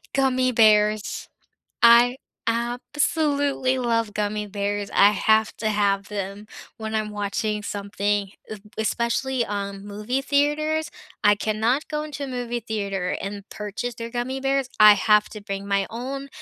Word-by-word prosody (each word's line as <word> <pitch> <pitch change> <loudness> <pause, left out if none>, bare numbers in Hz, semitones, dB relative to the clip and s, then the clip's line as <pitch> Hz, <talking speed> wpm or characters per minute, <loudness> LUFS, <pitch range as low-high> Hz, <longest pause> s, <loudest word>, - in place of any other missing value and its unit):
Gummy 255 -1 +2
bears, 215 -2 +3 0.6
I 235 +2 +7 0.3
absolutely 275 +3 0
love 230 -3 0
gummy 210 0 -2
bears, 205 0 -3
I 200 +1 +7
have 220 +1 +2
to 220 - -1
have 200 -1 +1
them 200 0 -5 0.3
when 220 -1 -5
I'm 215 -1 -1
watching 210 +1 -2
something, 200 0 -2 0.2
e 215 - -5 0.2
especially, 235 +3 0
um, 200 -1 -5
movie 210 +6 -3
theaters, 295 +3 +1 0.3
I 205 0 +7
cannot 220 +7 0
go 300 0 -2
into 290 -2 -6
a - - -5
movie 240 -1 -3
theater 200 -5 -3
and 200 +1 -6
purchase 210 +3 -5
their 230 0 -7
gummy 255 +2 -3
bears, 270 -1 0
I 215 0 +10
have 210 +1 +3
to 215 - -8
bring 200 -1 -5
my 200 -1 +1
own 270 +4 -5
220 Hz, 145 wpm, -24 LUFS, 205-255 Hz, 0.6 s, I